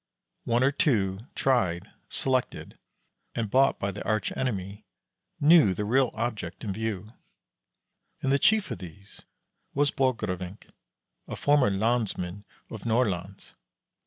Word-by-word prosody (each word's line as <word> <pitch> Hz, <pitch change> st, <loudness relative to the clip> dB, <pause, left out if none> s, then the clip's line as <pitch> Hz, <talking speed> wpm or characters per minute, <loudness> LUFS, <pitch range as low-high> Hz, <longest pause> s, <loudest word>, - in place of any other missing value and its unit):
One 120 Hz, +2 st, +2 dB
or 135 Hz, -, +4 dB
two, 110 Hz, -7 st, 0 dB
tried, 95 Hz, -8 st, +1 dB, 0.2 s
selected, 130 Hz, -2 st, -2 dB, 0.6 s
and 110 Hz, -3 st, -2 dB
bought 135 Hz, +1 st, +4 dB
by 100 Hz, -, -1 dB
the 100 Hz, -, -7 dB
arch 110 Hz, -3 st, -1 dB
enemy, 100 Hz, -6 st, -3 dB, 0.6 s
knew 145 Hz, -, +6 dB
the 105 Hz, -, -2 dB
real 130 Hz, +3 st, +3 dB
object 110 Hz, -7 st, -4 dB
in 100 Hz, -4 st, -2 dB
view, 110 Hz, 0 st, -4 dB, 1.1 s
and 135 Hz, -, +1 dB
the 140 Hz, -, +3 dB
chief 215 Hz, +7 st, +3 dB
of -, -, -4 dB
these 95 Hz, +3 st, -12 dB, 0.5 s
was 145 Hz, 0 st, +3 dB
Borgrevinck, 105 Hz, -7 st, -2 dB, 0.6 s
a -, -, -5 dB
former 145 Hz, -6 st, +3 dB
lansman 100 Hz, -2 st, -1 dB, 0.3 s
of 110 Hz, -, -7 dB
Nordlands. 105 Hz, -5 st, -1 dB
110 Hz, 125 wpm, -27 LUFS, 95-130 Hz, 1.1 s, knew